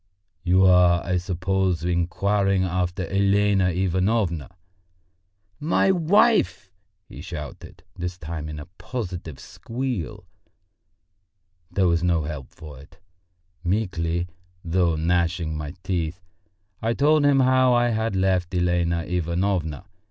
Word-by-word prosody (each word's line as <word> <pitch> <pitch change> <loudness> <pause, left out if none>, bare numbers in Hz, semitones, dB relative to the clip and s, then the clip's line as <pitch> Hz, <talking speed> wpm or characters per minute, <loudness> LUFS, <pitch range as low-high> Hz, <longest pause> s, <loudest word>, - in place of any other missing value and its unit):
"You 95 +1 +4
are, 90 -2 +5
I 90 -1 0
suppose, 90 -1 -1
inquiring 95 +3 +1
after 90 0 -1
Elena 100 0 +2
Ivanovna?" 95 -1 0 1.1
"My 165 +5 +2
wife?" 190 - +2 0.4
he - - -10
shouted, 80 -7 -8
this 90 0 -5
time 80 -2 -6
in 75 - -6
a 75 - -7
positive 90 - -6
squeal. 120 - -5 1.4
There 95 -2 +1
was 85 -1 +2
no 85 -3 +1
help 75 -3 -6
for 75 -4 -11
it! 70 - -17 0.7
Meekly, 85 -3 -1 0.4
though 85 -1 +2
gnashing 85 0 0
my 75 +2 -6
teeth, 90 -2 -2 0.6
I 115 +1 0
told 150 +3 +3
him 140 -1 +4
how 130 -1 +4
I 120 0 +3
had 110 -2 -1
left 95 -1 +1
Elena 85 -1 +1
Ivanovna. 90 -1 -1
90 Hz, 115 wpm, -24 LUFS, 85-100 Hz, 1.4 s, are